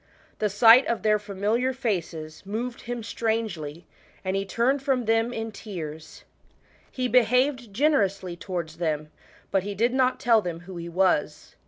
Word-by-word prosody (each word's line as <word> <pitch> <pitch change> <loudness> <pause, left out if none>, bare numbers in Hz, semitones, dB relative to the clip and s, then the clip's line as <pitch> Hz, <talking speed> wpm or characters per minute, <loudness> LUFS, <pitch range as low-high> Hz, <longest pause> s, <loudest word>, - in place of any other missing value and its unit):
The 210 - +1
sight 225 +5 +7
of 235 - -1
their 210 -1 +3
familiar 210 +5 -1
faces 170 - -3
moved 230 +5 -5
hun 240 -1 -4
strangely, 210 -10 -3 0.4
and 190 +1 0
he 195 0 -1
turned 255 +7 +1
from 265 -3 0
them 225 +2 +2
in 225 -2 -4
tears. 160 -8 -8 0.7
He 255 -1 -1
behaved 250 0 +2
generously 200 - +1
towards 170 -3 -5
them, 155 -3 -2 0.4
but 195 - +2
he 200 +2 -5
did 235 +5 +1
not 260 -1 +2
tell 230 -2 +4
them 170 -3 -5
who 180 0 -9
he 170 0 -6
was. 170 -4 0
210 Hz, 155 wpm, -26 LUFS, 175-240 Hz, 0.7 s, sight